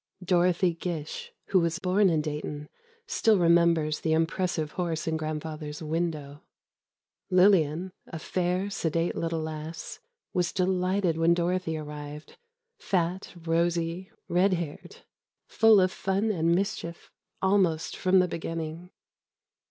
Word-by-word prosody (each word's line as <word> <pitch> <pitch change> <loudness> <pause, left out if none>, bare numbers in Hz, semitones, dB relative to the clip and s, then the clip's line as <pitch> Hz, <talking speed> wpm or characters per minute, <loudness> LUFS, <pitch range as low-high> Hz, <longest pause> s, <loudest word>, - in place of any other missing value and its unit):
Dorothy 180 0 +2
Gish, 165 -3 -5 0.2
who 190 - +4
was 170 -1 0
born 190 +1 +3
in 160 -3 +2
Dayton, 150 -1 -5 0.4
still 220 -2 +3
remembers 170 -3 +3
the 160 - 0
impressive 165 -1 0
horse 170 -3 -2
in 160 - 0
Grandfather's 155 -1 -5
window. 155 -3 -3 0.9
Lillian, 180 -2 +4 0.2
a 165 - -6
fair, 180 +4 -1
sedate 165 -3 -1
little 165 -1 -2
lass, 155 +1 -6 0.3
was 175 -1 +1
delighted 185 -2 +1
when 165 +1 +4
Dorothy 175 -1 -1
arrived—fat, 175 - -5
rosy, 170 +2 0 0.2
red 185 +3 +3
haired—full 180 +5 0
of 185 -1 +3
fun 195 +4 0
and 170 -3 +2
mischief, 180 -3 -3 0.3
almost 190 -5 +1
from 185 0 +3
the 180 -1 +4
beginning. 165 0 -5
170 Hz, 115 wpm, -28 LUFS, 160-185 Hz, 0.9 s, who